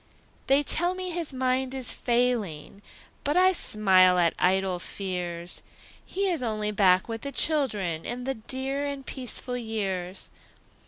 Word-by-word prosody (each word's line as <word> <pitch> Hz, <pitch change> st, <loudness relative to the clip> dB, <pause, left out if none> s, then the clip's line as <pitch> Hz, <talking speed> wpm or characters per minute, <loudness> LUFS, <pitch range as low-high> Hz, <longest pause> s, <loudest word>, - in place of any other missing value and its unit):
They 275 Hz, +2 st, +4 dB
tell 350 Hz, +5 st, +2 dB
me 370 Hz, -1 st, -3 dB
his 335 Hz, -3 st, -3 dB
mind 260 Hz, 0 st, -1 dB
is 260 Hz, -2 st, +1 dB
failing, 235 Hz, -, -1 dB, 0.4 s
But 290 Hz, +4 st, +1 dB
I 370 Hz, +1 st, +6 dB
smile 190 Hz, -, +4 dB
at 170 Hz, -2 st, +3 dB
idle 185 Hz, 0 st, +1 dB
fears; 175 Hz, -2 st, -4 dB, 0.4 s
He 395 Hz, +1 st, -2 dB
is 345 Hz, -6 st, 0 dB
only 215 Hz, -3 st, -2 dB
back 190 Hz, -3 st, +3 dB
with 225 Hz, -1 st, -5 dB
the 280 Hz, -, -5 dB
children, 210 Hz, -, +1 dB
In 245 Hz, +1 st, -5 dB
the 270 Hz, +1 st, -1 dB
dear 265 Hz, +4 st, -3 dB
and 280 Hz, -1 st, -5 dB
peaceful 250 Hz, -1 st, -3 dB
years. 195 Hz, -5 st, -3 dB
235 Hz, 145 wpm, -27 LUFS, 190-275 Hz, 0.4 s, I